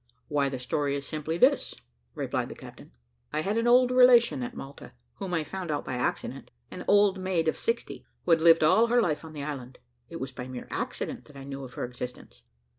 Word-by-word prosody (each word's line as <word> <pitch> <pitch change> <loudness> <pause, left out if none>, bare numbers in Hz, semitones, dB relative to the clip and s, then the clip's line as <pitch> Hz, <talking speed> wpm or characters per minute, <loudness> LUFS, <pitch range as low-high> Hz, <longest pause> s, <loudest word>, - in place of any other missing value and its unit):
"Why 145 -2 +1
the 135 - -4
story 140 +3 -1
is 140 0 -4
simply 155 +2 -3
this," - - +3 0.4
replied - - -2
the - - -8
captain. - - -12 0.4
"I 155 - -1
had 200 +6 -1
an 230 - 0
old 250 +1 +5
relation 250 +1 +6
at 245 0 -5
Malta, 140 +1 -10 0.2
whom 190 - -5
I 165 -3 0
found 185 +2 -6
out 145 -1 -2
by - - -4
accident 125 - -3 0.2
an - - -7
old 205 -1 +4
maid 185 -3 0
of 160 - +2
sixty, 230 +1 -3 0.2
who 175 - +1
had 165 -1 +5
lived 165 -1 +6
all 220 +9 +5
her 240 +1 +3
life 165 -10 0
on 160 -1 -10
the 145 -2 -5
island. 130 -4 -6 0.3
It 165 - -7
was 130 0 -5
by 125 -1 -7
mere 130 -1 -7
accident - - -4
that 145 - -15
I 135 - -8
knew 135 0 -7
of 125 -2 -10
her - - -2
existence. 125 - -8
155 Hz, 220 wpm, -28 LUFS, 140-200 Hz, 0.4 s, relation